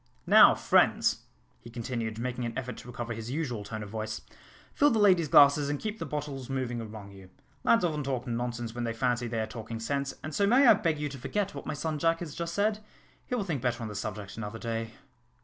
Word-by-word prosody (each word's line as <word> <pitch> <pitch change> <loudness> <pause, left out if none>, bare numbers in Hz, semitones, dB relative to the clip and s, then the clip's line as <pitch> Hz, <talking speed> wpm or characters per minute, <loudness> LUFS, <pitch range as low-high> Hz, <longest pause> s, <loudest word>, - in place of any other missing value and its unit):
Now, - - +8
friends," - - +3 0.3
he 115 - -12
continued, 115 -2 -4
making 125 +1 -3
an 115 -1 -4
effort 125 -1 -4
to - - -11
recover 120 -1 -5
his 115 0 -6
usual 130 -7 -3
tone 110 +1 -6
of 100 - -9
voice, 110 0 -4 0.5
"fill 290 - +4
the 230 - +1
ladies' 185 -6 +5
glasses, 145 0 +6
and 145 -1 -1
keep 215 0 -4
the - - -4
bottles 145 -3 -5
moving 125 -3 -2
among 105 -2 -9
you. 95 -1 -14 0.3
Lads 230 -5 +4
often 150 -3 -1
talk 130 -2 -2
nonsense 120 -1 -3
when 120 0 -4
they 115 -1 -1
fancy 120 +1 0
they 115 -1 -2
are - - -1
talking 115 0 -7
sense, 140 +4 -2
and 155 - -5
so 200 +6 +2
may 255 +6 +5
I 240 - +9
beg 165 -3 0
you 150 0 -2
to 140 -1 -8
forget 200 +9 -2
what - - -8
my - - -2
son 155 +1 -3
Jack 165 +2 +2
has 160 -4 -5
just 170 0 -4
said? 210 +1 +1 0.5
He 250 - -1
will 230 - -1
think 160 -9 -3
better 120 -1 -1
on 110 - -4
the 105 - -7
subject 105 -1 -5
another 115 0 -5
day." 115 0 -4
125 Hz, 235 wpm, -29 LUFS, 115-155 Hz, 0.5 s, I